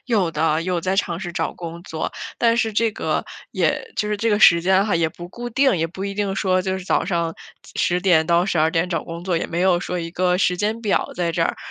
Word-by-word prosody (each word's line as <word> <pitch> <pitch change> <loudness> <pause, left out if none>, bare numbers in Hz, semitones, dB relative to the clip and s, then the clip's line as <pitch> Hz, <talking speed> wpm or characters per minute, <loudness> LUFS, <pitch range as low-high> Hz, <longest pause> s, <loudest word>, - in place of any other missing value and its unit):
有 205 -8 +1
的， 155 +1 +1
有 180 -1 -1
在 190 +2 -1
尝 175 -4 0
试 175 -3 -5
找 - - -2
工 170 0 -8
作， 160 -4 -4 0.3
但 230 0 +3
是 225 -2 +1
这 225 +2 +2
个 - - -2 0.3
也 460 - -1
就 210 - -1
是 210 - 0
这 225 +3 0
个 205 - +2
时 170 -5 +7
间 190 +3 +3
哈 210 - 0
也 165 -1 +1
不 175 +2 -10
固 240 +6 -6
定， 265 -2 +3
也 165 0 0
不 190 +3 -7
一 200 0 -4
定 200 -1 -1
说 185 -2 +1
就 190 0 -1
是 185 - -9
早 - - +1
上 170 -2 -1 0.4
10:00-12:00 170 -1 +2
找 165 -3 -1
工 170 0 -7
作， 180 -3 0
也 - - -1
没 170 - -3
有 185 -1 +3
说 180 -2 -3
一 165 -1 -4
个 180 +1 +1
时 180 -1 +2
间 215 +4 -1
表 210 -3 0
在 170 -1 -1
这 165 - +1
儿。 - - 0
180 Hz, 250 characters per minute, -21 LUFS, 170-200 Hz, 0.4 s, 时